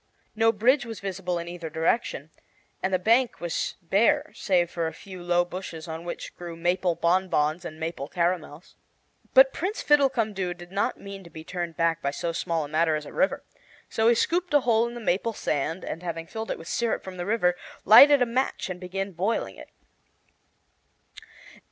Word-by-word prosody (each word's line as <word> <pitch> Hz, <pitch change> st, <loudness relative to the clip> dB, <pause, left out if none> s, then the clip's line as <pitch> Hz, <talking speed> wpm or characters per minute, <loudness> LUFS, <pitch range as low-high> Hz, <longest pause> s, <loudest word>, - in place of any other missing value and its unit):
No 225 Hz, +1 st, +4 dB
bridge 245 Hz, +6 st, +3 dB
was 225 Hz, -2 st, -7 dB
visible 190 Hz, -2 st, -3 dB
in 170 Hz, 0 st, -5 dB
either 170 Hz, -2 st, -6 dB
direction, 165 Hz, -, -1 dB, 0.5 s
and 190 Hz, -, -1 dB
the 185 Hz, -, +3 dB
bank 230 Hz, +6 st, +2 dB
was 175 Hz, -1 st, -2 dB
bare 285 Hz, -, +2 dB
save 175 Hz, -3 st, +1 dB
for 165 Hz, -1 st, -1 dB
a 160 Hz, -, -5 dB
few 185 Hz, -2 st, -10 dB
low 175 Hz, 0 st, +2 dB
bushes 175 Hz, -3 st, -7 dB
on 160 Hz, +1 st, -6 dB
which 175 Hz, -, -6 dB
grew 175 Hz, -1 st, -8 dB
maple 175 Hz, +1 st, 0 dB
bonbons 170 Hz, -2 st, +1 dB
and 155 Hz, -1 st, -7 dB
maple 160 Hz, -3 st, -4 dB
caramels. 170 Hz, -1 st, -2 dB, 0.6 s
But -, -, +8 dB
Prince 400 Hz, +5 st, -3 dB
Fiddlecumdoo 230 Hz, -11 st, +2 dB
did 175 Hz, 0 st, -12 dB
not 200 Hz, +1 st, -1 dB
mean 200 Hz, -1 st, -9 dB
to 170 Hz, -, -13 dB
be 160 Hz, 0 st, -10 dB
turned 175 Hz, -1 st, -5 dB
back 165 Hz, 0 st, +1 dB
by 140 Hz, -, 0 dB
so 165 Hz, +4 st, -3 dB
small 165 Hz, -2 st, -2 dB
a -, -, -8 dB
matter 155 Hz, +1 st, +2 dB
as 150 Hz, -1 st, -4 dB
a -, -, -10 dB
river, 285 Hz, -, +1 dB, 0.5 s
so 220 Hz, 0 st, +1 dB
he 235 Hz, -, +6 dB
scooped 345 Hz, +5 st, 0 dB
a 290 Hz, -, +6 dB
hole 235 Hz, -2 st, +2 dB
in 235 Hz, -, -8 dB
the -, -, -6 dB
maple 220 Hz, +1 st, 0 dB
sand, 160 Hz, 0 st, -2 dB
and 165 Hz, -, -5 dB
having 165 Hz, -2 st, -4 dB
filled 220 Hz, +6 st, -6 dB
it -, -, -2 dB
with 165 Hz, -, -11 dB
syrup 235 Hz, +3 st, -1 dB
from 185 Hz, -1 st, -8 dB
the 175 Hz, -, -4 dB
river, 180 Hz, -5 st, +2 dB, 0.3 s
lighted 275 Hz, +6 st, +9 dB
a -, -, +1 dB
match 240 Hz, -4 st, -1 dB
and 180 Hz, -, -6 dB
began 195 Hz, +2 st, -4 dB
boiling 190 Hz, +6 st, -2 dB
it. -, -, -12 dB
180 Hz, 190 wpm, -26 LUFS, 170-225 Hz, 0.6 s, lighted